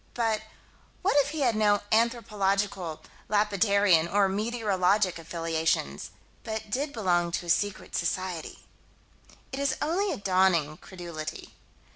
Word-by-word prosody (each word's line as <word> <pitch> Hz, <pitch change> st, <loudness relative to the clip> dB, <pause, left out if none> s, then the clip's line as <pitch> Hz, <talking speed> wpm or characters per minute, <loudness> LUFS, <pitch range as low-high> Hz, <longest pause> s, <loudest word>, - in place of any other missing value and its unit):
But 225 Hz, -2 st, +1 dB, 0.6 s
what 385 Hz, -, +2 dB
if 285 Hz, -, +2 dB
he 310 Hz, 0 st, -4 dB
had 240 Hz, -5 st, +2 dB
no 205 Hz, -1 st, +3 dB
anthropological, 200 Hz, -6 st, 0 dB, 0.3 s
lapidarian, 200 Hz, -4 st, +3 dB
or 200 Hz, -1 st, +4 dB
meteorological 200 Hz, -3 st, +1 dB
affiliations 165 Hz, 0 st, -1 dB, 0.3 s
but 220 Hz, -1 st, -5 dB
did 280 Hz, +5 st, -1 dB
belong 175 Hz, -7 st, +1 dB
to 175 Hz, -, -2 dB
a -, -, -7 dB
secret 205 Hz, +3 st, -1 dB
society 175 Hz, -1 st, -3 dB, 0.9 s
It 265 Hz, -, -4 dB
is 280 Hz, -1 st, 0 dB
only 375 Hz, +6 st, 0 dB
a -, -, -3 dB
dawning 185 Hz, -6 st, +2 dB
credulity. 170 Hz, -4 st, -8 dB
200 Hz, 120 wpm, -28 LUFS, 175-220 Hz, 0.9 s, or